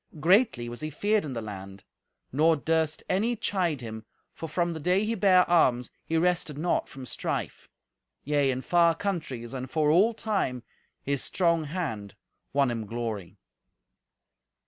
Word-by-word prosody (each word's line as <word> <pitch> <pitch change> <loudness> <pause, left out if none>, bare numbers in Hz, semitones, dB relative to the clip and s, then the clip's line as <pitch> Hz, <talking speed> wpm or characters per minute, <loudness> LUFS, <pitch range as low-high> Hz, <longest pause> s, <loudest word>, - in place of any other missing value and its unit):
Greatly 180 - +3
was 120 +3 -7
he 155 - -3
feared 205 +7 +1
in 145 -4 -5
the 115 -2 -4
land; 100 -2 -8 0.5
nor 160 +5 +4
durst 160 +1 0
any 225 +6 +1
chide 180 - -1
him, 110 -2 -7 0.3
for 165 - -7
from 170 +2 0
the 160 - -6
day 180 +6 +2
he 225 - 0
bare 190 -4 +4
arms 125 -8 +3
he 165 - -1
rested 170 -3 +1
not 170 +3 0
from 130 -1 -9
strife. - - -4 0.5
Yea, 145 -1 +2
in 130 0 -2
far 170 -1 +4
countries 150 - -4
and 130 -1 -5
for 150 0 +2
all 210 +8 +4
time, 195 - -1 0.4
his 140 -1 -1
strong 170 -3 +1
hand 140 - -4 0.4
won 140 -2 +2
him 115 -3 -4
glory. 110 -5 -5
155 Hz, 155 wpm, -27 LUFS, 125-180 Hz, 0.5 s, nor